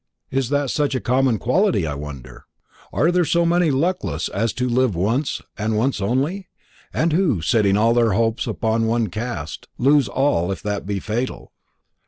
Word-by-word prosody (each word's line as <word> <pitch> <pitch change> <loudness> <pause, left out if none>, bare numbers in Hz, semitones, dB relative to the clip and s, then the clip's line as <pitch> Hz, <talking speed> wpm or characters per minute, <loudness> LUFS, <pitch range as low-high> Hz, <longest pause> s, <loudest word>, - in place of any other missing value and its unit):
Is 130 -2 0
that 145 -2 0
such 145 -2 0
a - - 0
common 125 -1 +2
quality, 170 - +1
I 75 - -2
wonder? 70 -4 -9 0.4
are 165 +4 +2
there 180 0 +2 0.2
many 170 0 +3
so 135 - +1
luckless 180 +6 -1
as 115 -1 -1
to 125 0 -1
love 125 -4 +1
once 115 - -1 0.2
and 110 +1 0
once 120 -1 0
only, 140 - -1 0.4
and 160 0 0
who, 165 - +2
setting 100 -1 +3
all 115 +2 +3
their 115 -3 +3
hopes 115 +2 0
upon 115 0 0
one 115 -2 +1
cast, 90 -6 -5
lose 140 0 +4
all 100 -7 +1
if 95 - -5
that 105 -2 -3
be 100 -1 -1
fatal?" 115 +6 -4
120 Hz, 175 wpm, -21 LUFS, 105-140 Hz, 0.4 s, lose